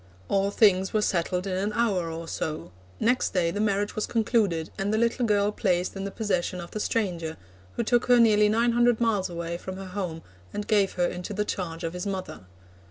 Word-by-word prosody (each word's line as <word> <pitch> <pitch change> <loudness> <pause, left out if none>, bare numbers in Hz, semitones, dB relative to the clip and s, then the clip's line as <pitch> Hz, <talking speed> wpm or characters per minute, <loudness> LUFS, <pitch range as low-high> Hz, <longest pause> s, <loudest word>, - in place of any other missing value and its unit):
All 195 0 +2
things 190 -3 +3
were 215 - +2
settled 180 0 0
in 190 -2 -2
an 200 +3 -1
hour 195 -8 +1
or 165 0 -6
so; 155 - -4 0.3
next 245 -2 +1
day 170 -2 +2
the 205 - -4
marriage 205 -1 0
was 215 - -1
concluded, 210 -8 +1
and 195 +1 -1
the 215 - +1
little 235 +1 +1
girl 205 -1 +2
placed 180 -4 0
in 195 0 -4
the - - -2
possession 190 -4 -1
of 170 0 -8
the 215 - -4
stranger, 175 -8 -1 0.4
who - - -1
took 240 +1 +2
her 245 -1 +6
nearly 210 -2 +5
nine 230 +2 +3
hundred 240 -1 +3
miles 215 -5 +1
away 170 0 -4
from 185 0 -7
her 195 - -7
home, 180 -4 -4 0.3
and 210 - -3
gave 205 -3 +2
her 180 - +1
into 180 +3 -4
the 210 +1 0
charge 170 -4 -4
of 165 0 -3
his 180 +2 -4
mother. 190 - -5
195 Hz, 215 wpm, -26 LUFS, 180-215 Hz, 0.4 s, her